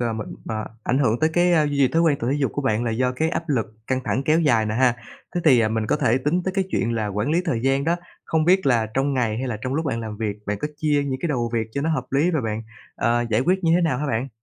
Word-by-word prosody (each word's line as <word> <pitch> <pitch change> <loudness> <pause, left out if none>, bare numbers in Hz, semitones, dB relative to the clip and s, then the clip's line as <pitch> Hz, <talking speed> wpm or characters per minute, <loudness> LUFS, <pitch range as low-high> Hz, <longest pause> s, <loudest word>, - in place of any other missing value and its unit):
m 115 -2 -1 0.3
m - - -7 0.3
ảnh 130 - +1
hưởng 120 -2 +1
tới 160 0 +3
cái 175 -3 +3
duy 145 - -2
trì 135 -2 +4
thói 165 +1 +2
quen 150 -4 +3
tập 115 - -3
thể 145 - +1
dục 135 - 0
của 145 - -2
bạn 115 -2 0
là 115 - 0
do 125 +3 0
cái 160 +5 0
áp 165 -1 -3
lực 125 -6 +1 0.2
căng 130 0 0
thẳng 135 - 0
kéo 155 +3 +3
dài 115 -8 +3
nè 105 - -2
ha, 125 -1 +3 0.4
thế 175 - 0
thì 120 -7 +5
mình 110 -1 -1
có - - +1
thể 120 +4 +2
tính 155 +7 0
tới 190 - -1
cái 195 -1 +1
chuyện 115 0 0
là 110 -2 -1
quản 105 +7 -2
lý 170 +2 +2
thời 125 -10 -1
gian 135 +1 +1
đó. 170 +2 +1 0.3
Không 160 -1 +1
biết 185 -1 +3
là 115 -4 +3
trong 135 +1 +1
ngày 115 -3 0
hay 130 0 -3
là 110 - -2
trong 130 +1 -2
lúc 160 +2 -1
bạn 115 -4 -1
làm 110 -2 -6
việc, 105 -2 -3
bạn 105 0 -2
có 150 - -2
chia 150 -1 +1
những 130 -1 -3
cái 170 - -1
đầu 120 -5 -1
việc 110 -1 0
cho 140 - -2
nó 160 +3 0
hợp - - -2
lý 145 +6 +2
rồi 155 -7 0
bạn, 110 0 -3 0.3
ờ, 120 +1 +1
giải 110 - +2
quyết 185 +5 +1
như 165 - +4
thế 180 - +3
nào 155 -6 +1
hả 150 - -2
bạn? 125 +1 -1
130 Hz, 310 wpm, -23 LUFS, 115-155 Hz, 0.4 s, thì